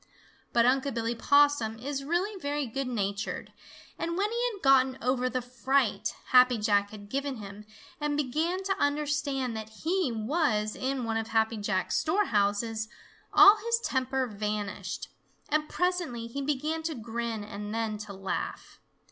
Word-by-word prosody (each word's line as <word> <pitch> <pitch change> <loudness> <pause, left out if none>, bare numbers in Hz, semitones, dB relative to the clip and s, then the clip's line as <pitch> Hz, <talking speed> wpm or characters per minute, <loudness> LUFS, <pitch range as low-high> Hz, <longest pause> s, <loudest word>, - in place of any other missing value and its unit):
But 235 0 +4
Unc' 270 +2 +2
Billy 230 0 0
Possum 285 -3 +3
is 275 +3 -4
really 350 +8 0
very 285 0 -1
good 265 +3 -3
natured, 205 -3 -3 0.5
and 335 +1 -2
when 410 +2 +1
he 480 +1 +1
had 400 -4 -11
gotten 265 -1 +5
over 255 +1 +1
the 255 -1 -2
fright 245 -4 0
Happy 250 -1 +6
Jack 205 -1 +2
had 205 -1 -10
given 275 +3 -2
him 205 -1 -9 0.3
and 295 -1 -1
began 315 +7 0
to 390 0 0
understand 285 -4 0
that 220 0 -5
he 325 - -1
was 220 -2 0
in 260 0 -2
one 225 -1 -1
of 225 0 -2
Happy 225 0 +1
Jack's 195 -3 0
storehouses, 220 - +1 0.4
all 400 +2 +9
his 465 +2 0
temper 260 0 0
vanished, 210 -2 -4 0.4
and 305 0 +1
presently 355 -10 -1
he 235 +5 -5
began 300 +3 -1
to 320 -1 -3
grin 230 -1 -4
and 205 0 -6
then 220 -1 -2
to 210 -1 -7
laugh. 195 0 -5
255 Hz, 155 wpm, -29 LUFS, 220-295 Hz, 0.5 s, all